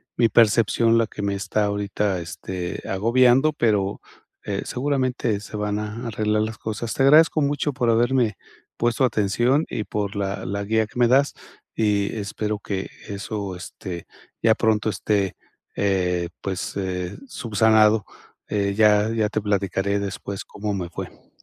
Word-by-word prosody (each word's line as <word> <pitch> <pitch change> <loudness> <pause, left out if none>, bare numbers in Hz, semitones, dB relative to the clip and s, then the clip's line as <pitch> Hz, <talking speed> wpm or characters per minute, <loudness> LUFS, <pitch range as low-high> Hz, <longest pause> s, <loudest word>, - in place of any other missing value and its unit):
mi 120 - +4
percepción 115 +1 +4
la 115 - +2
que - - -8
me 100 0 0
está 105 +2 -1
ahorita, 100 -1 -1
este, 90 +1 -5
agobiando, 125 +8 +4
pero, 105 -7 0 0.4
eh, - - -3
seguramente 130 -5 -1
se 105 - -10
van 105 0 -1
a 105 +3 -5
arreglar 105 -1 0
las 110 0 -3
cosas. 110 +1 -4
Te 135 - +1
agradezco 155 +3 +6
mucho 145 +1 0
por 120 -2 0
haberme 120 -2 +2 0.4
puesto 120 +3 +2
atención 120 +6 +2
y 110 - -2
por 105 -1 -3
la 100 -1 -3
la 100 +2 -2
guía 110 +1 +1
que 120 - -8
me 120 - +5
das, 135 +4 +3 0.4
y 105 -2 +1
espero 105 0 -3
que 100 -1 -4 0.2
eso, 100 -2 -4
este, 90 -1 -8 0.4
ya 110 -1 +5
pronto 110 -1 +1
esté, 100 0 0 0.4
eh, 90 -3 +1
pues, 95 -2 -4
eh, 90 -2 -3
subsanado, 110 - +3 0.5
eh, 100 -1 0
ya 105 0 +4
ya 110 -2 +1
te 110 - -1
platicaré 100 0 0
después 100 0 -5
cómo 105 0 -4
me 90 -3 -3
fue. 85 - -9
105 Hz, 150 wpm, -23 LUFS, 100-115 Hz, 0.5 s, agradezco